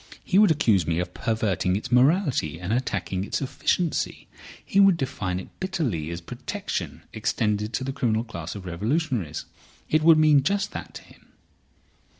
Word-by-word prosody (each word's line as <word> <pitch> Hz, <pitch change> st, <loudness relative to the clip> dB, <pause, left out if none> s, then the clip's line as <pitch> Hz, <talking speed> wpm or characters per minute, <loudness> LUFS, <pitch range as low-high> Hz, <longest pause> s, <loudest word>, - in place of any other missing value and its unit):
He 190 Hz, -, +3 dB
would 210 Hz, -, +6 dB
accuse 115 Hz, -, +3 dB
me 85 Hz, -1 st, 0 dB
of 90 Hz, +1 st, -3 dB
perverting 100 Hz, -5 st, 0 dB
its 110 Hz, +5 st, -4 dB
morality 130 Hz, -, +3 dB
and 90 Hz, +4 st, -2 dB
attacking 100 Hz, -6 st, -1 dB
its -, -, -2 dB
efficiency. 150 Hz, +5 st, -1 dB, 0.4 s
He 195 Hz, -, +1 dB
would 195 Hz, -3 st, +6 dB
define 105 Hz, -, -2 dB
it 95 Hz, -, -9 dB
bitterly 150 Hz, -, -2 dB
as 85 Hz, 0 st, -5 dB
protection 85 Hz, -, -5 dB
extended 105 Hz, 0 st, -1 dB
to 130 Hz, -, -1 dB
the 135 Hz, 0 st, -3 dB
criminal 115 Hz, -5 st, 0 dB
class 115 Hz, -2 st, -7 dB
of 100 Hz, -2 st, -8 dB
revolutionists. 105 Hz, -, -2 dB, 0.5 s
It 155 Hz, -, +4 dB
would 160 Hz, 0 st, +7 dB
mean 155 Hz, -2 st, +5 dB
just 195 Hz, +7 st, 0 dB
that -, -, -8 dB
to -, -, -9 dB
him." -, -, -20 dB
115 Hz, 160 wpm, -25 LUFS, 95-155 Hz, 0.5 s, would